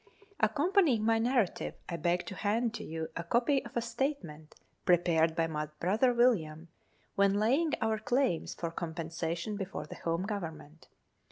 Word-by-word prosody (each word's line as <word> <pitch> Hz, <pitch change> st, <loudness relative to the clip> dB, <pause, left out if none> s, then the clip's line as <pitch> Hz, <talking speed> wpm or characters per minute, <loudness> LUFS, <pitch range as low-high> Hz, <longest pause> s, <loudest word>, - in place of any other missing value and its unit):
Accompanying 285 Hz, -, +3 dB
my 225 Hz, 0 st, +3 dB
narrative, 235 Hz, -4 st, 0 dB
I 170 Hz, -, -3 dB
beg 175 Hz, +1 st, 0 dB
to 190 Hz, -, -6 dB
hand 220 Hz, +4 st, 0 dB
to -, -, -6 dB
you 160 Hz, 0 st, -5 dB
a 165 Hz, -, -3 dB
copy 245 Hz, -, +2 dB
of -, -, -7 dB
a -, -, +2 dB
statement 235 Hz, -, -4 dB
l -, -, -35 dB, 0.2 s
prepared 170 Hz, -3 st, +3 dB
by 165 Hz, -1 st, +2 dB
my 155 Hz, -1 st, -3 dB
brother 215 Hz, +8 st, +3 dB
William, 170 Hz, -10 st, +1 dB, 0.4 s
when 200 Hz, 0 st, +3 dB
laying 270 Hz, +10 st, +2 dB
our 220 Hz, -1 st, +1 dB
claims 245 Hz, -5 st, 0 dB
for 170 Hz, -1 st, -4 dB
compensation 165 Hz, +3 st, -4 dB
before 195 Hz, -1 st, -5 dB
the -, -, -9 dB
Home 165 Hz, +2 st, -1 dB
Government. 160 Hz, -7 st, -6 dB
195 Hz, 160 wpm, -31 LUFS, 165-235 Hz, 0.4 s, Accompanying